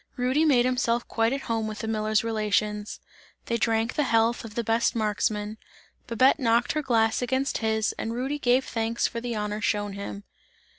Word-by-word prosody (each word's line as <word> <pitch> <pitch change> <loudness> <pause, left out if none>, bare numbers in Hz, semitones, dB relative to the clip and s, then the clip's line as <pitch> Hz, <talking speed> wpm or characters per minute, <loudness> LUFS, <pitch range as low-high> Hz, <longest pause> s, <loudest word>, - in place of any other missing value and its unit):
Rudy 260 +5 +2
made 250 -5 +4
himself 240 -2 0
quite 225 0 +1
at 275 +1 -2
home 225 -3 -2
with 215 -1 -5
the 220 - -5
miller's 215 0 +1
relations; 210 -1 -1 0.5
they 235 - -1
drank 225 0 +1
the - - 0
health 230 0 +2
of 220 -2 -10
the 235 - -1
best 230 +2 +1
marksman. 210 0 -1 0.5
Babette 255 +5 +3
knocked 235 -2 +2
her 305 - -1
glass 225 -5 +1
against 260 +2 -1
his 220 -1 0
and 225 - -2
Rudy 265 +5 -2
gave 255 0 +2
thanks 230 0 -1
for 230 - -2
the 240 -1 -3
honour 210 0 -3
shown 205 -1 -1
him. 200 0 -7
225 Hz, 185 wpm, -26 LUFS, 215-245 Hz, 0.5 s, made